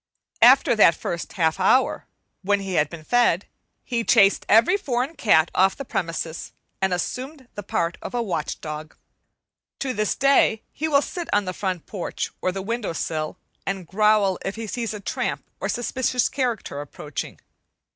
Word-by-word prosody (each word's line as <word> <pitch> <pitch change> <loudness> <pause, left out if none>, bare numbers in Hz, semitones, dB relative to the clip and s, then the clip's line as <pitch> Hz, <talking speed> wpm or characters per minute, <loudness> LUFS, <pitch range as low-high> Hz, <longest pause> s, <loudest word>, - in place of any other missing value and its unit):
After 250 0 +7
that 170 -6 +6
first 170 0 -5
half 160 -1 +1
hour, 255 +8 +2 0.3
when 200 +1 +1
he 195 -1 -5
had 150 -3 +2
been 165 -1 -9
fed, 220 -2 +2 0.4
he 235 -2 -1
chased 200 -3 +4
every 230 - +6
foreign 275 -5 -2
cat 170 - +3
off 190 +1 +3
the 275 - -6
premises, 165 -5 -4 0.3
and 190 0 +2
assumed 260 - -4
the 205 - -6
part 170 -3 -2
of - - -6
a 240 - +1
watch 180 -7 -3
dog. 155 0 -7 0.8
To 265 -2 -2
this 215 -2 0
day 275 -5 +3
he 315 - -3
will 285 -2 +3
sit 350 -2 -6
on 205 -1 +2
the 185 - -3
front 185 -4 -3
porch 190 -5 -4
or 185 - +1
the 190 +1 -5
window 230 -3 -2
sill 155 -1 -3 0.3
and 195 -2 -3
growl 205 +1 +3
if 195 - -3
he 225 0 -5
sees 230 0 -3
a - - -6
tramp 200 - -3
or - - -2
suspicious 250 +1 0
character 240 - -2
approaching. 145 0 -7
205 Hz, 170 wpm, -23 LUFS, 175-245 Hz, 0.8 s, After